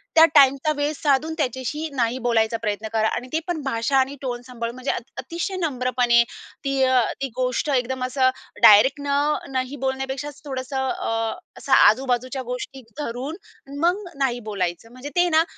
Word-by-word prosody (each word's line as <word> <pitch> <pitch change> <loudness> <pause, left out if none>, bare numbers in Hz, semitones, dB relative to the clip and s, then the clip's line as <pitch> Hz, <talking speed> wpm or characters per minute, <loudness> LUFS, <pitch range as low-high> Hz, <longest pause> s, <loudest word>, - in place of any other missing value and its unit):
त्या 325 0 +9
टाईमचा 275 +1 +5
वेळ 290 +1 0
साधून 295 +2 +1
त्याच्याशी 275 +2 -2
नाही 240 -1 0
बोलायचं 225 -1 +2
प्रयत्न 210 0 -2
करा 220 -1 +2
आणि 250 - -5
ते 320 - +2
पण 345 -3 -2
भाषा 265 +1 0
आणि 265 +1 +1
टोन 245 -3 -4
सांभाळून 235 -1 -5
म्हणजे 255 +2 -2
अति 245 +3 -6
अतिशय 345 +3 -4
नम्रपणे 250 -5 +2
ती, 275 +3 -4 0.4
ती 275 - 0
गोष्ट 255 +3 -1
एकदम 255 +1 -1
असं 255 0 +2 0.3
डायरेक्ट 230 +7 +7
न - - -5 0.4
नही 260 +1 -2
बोलण्यापेक्षा 265 +2 -2 0.2
थोडंसं 265 -1 -3
अ, 225 -2 -2 0.2
असं 275 - -8
आजूबाजूच्या 255 +3 +3
गोष्टी 265 +1 -7 0.2
धरून 270 +2 -4 0.4
मग 355 +6 +1
नाही 260 -3 0
बोलायचं 185 +2 -3
म्हणजे 255 +3 -8
ते 355 0 +4
ना, 320 0 +4
260 Hz, 160 wpm, -23 LUFS, 240-280 Hz, 0.4 s, त्या